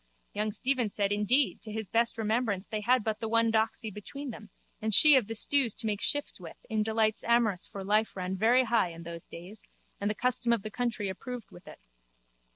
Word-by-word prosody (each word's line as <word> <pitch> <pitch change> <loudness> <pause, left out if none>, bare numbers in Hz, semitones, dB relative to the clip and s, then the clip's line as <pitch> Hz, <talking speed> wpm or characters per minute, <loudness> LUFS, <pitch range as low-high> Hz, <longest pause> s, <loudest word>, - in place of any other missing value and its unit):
Young 210 +1 -1
Stephen 255 0 0
said 200 -1 -1
indeed 220 +7 +1
to 215 - -6
his 220 -1 -4
best 230 0 +1
remembrance 220 -3 -1
they 215 -1 -4
had 250 +2 +2
but 220 -1 -2
the 225 - -3
one 230 0 +3
doxy 220 0 0
between 275 +7 -7
them 215 -1 -11 0.3
and 220 0 -1
she 300 -2 +9
of 250 -6 +2
the 225 - -5
stews 250 0 +2
to 230 - -1
make 210 -2 -2
shift 290 0 -1
with - - -11
in 220 -1 +1
delights 220 0 0
amorous 230 -6 +1
for 195 - -8
life 210 +3 +1
ran 185 0 -3
very 235 +6 +3
high 230 -6 +1
in 165 0 -10
those 170 0 -9
days 185 +5 -11 0.4
and 205 - -1
the 210 - -2
custom 250 +1 0
of 230 -4 +1
the 215 - -6
country 220 -2 -2
approved 240 +4 -7
with 175 - -15
it. - - -13
220 Hz, 215 wpm, -29 LUFS, 205-235 Hz, 0.4 s, she